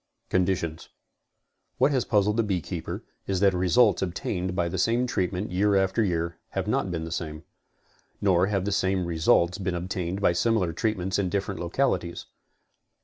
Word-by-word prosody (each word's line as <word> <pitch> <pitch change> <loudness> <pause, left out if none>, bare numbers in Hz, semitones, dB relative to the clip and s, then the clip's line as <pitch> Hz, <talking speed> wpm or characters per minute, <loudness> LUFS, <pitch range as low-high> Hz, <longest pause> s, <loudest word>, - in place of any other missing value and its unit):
CONDITIONS. 90 -3 0 0.9
What 135 +4 +3
has 130 -4 +1
puzzled 105 +1 +2
the - - +4
beekeeper 95 -6 -3 0.2
is 95 -2 0
that 100 -1 +4
results 90 +6 +3
obtained 90 0 -2
by 85 -2 +1
the 85 - -3
same 120 +2 +2
treatment 95 -4 -2
year 100 +3 +2
after 95 +4 +2
year 85 -3 -1 0.2
have - - -1
not 95 - 0
been 85 -2 -3
the 80 - -7
same. 80 -1 -4 0.8
Nor 95 -2 +3
have 100 -2 -1
the 100 - -1
same 95 -2 +1
results 85 +1 +2
been 95 -2 -2
obtained 90 +1 -3
by 100 - +3
similar 95 -3 +1
treatments 95 0 -1
in 95 -2 0
dif 100 +2 -1
ferent 100 - -5
localities. 85 -2 -1
95 Hz, 165 wpm, -26 LUFS, 85-100 Hz, 0.9 s, the